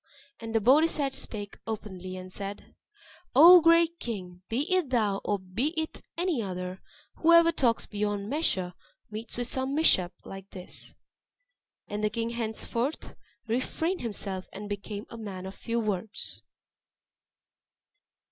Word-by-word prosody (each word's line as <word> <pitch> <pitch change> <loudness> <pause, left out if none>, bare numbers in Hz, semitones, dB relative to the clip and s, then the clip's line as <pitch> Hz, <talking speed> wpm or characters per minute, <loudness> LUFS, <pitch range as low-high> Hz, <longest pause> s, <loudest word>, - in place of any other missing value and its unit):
And 225 0 -6
the - - +5
Bodisat 280 +4 +4
spake 205 -2 -6
openly, 190 -4 -5
and 185 0 -9
said, 200 0 -7 0.6
"O 345 +5 +10
great 335 +1 +5
king! 180 -6 -6
be 230 +4 0
it 365 -7 +2
thou, 215 -6 +1
or 205 - +1
be 230 - -2
it 315 - -4 0.2
any 345 -7 0
other, 185 -1 -5 0.4
whoever 335 0 +6
talks 245 -8 +1
beyond 205 -1 -2
measure 200 - +1 0.4
meets 220 +3 -6
with 245 - -1
some 265 +3 -1
mishap 190 - +4
like 195 0 -9
this." 180 -2 -10 0.9
And 210 +1 -4
the 210 - +3
king 230 +2 -2
henceforth 235 +4 -2 0.3
refrained 260 +10 -1
himself, 200 -5 -4
and 205 +2 -7
became 205 +1 -5
a 230 - -8
man 190 -4 -6
of 190 - -6
few 235 +2 -2
words. 215 0 -2
220 Hz, 135 wpm, -29 LUFS, 195-275 Hz, 0.9 s, O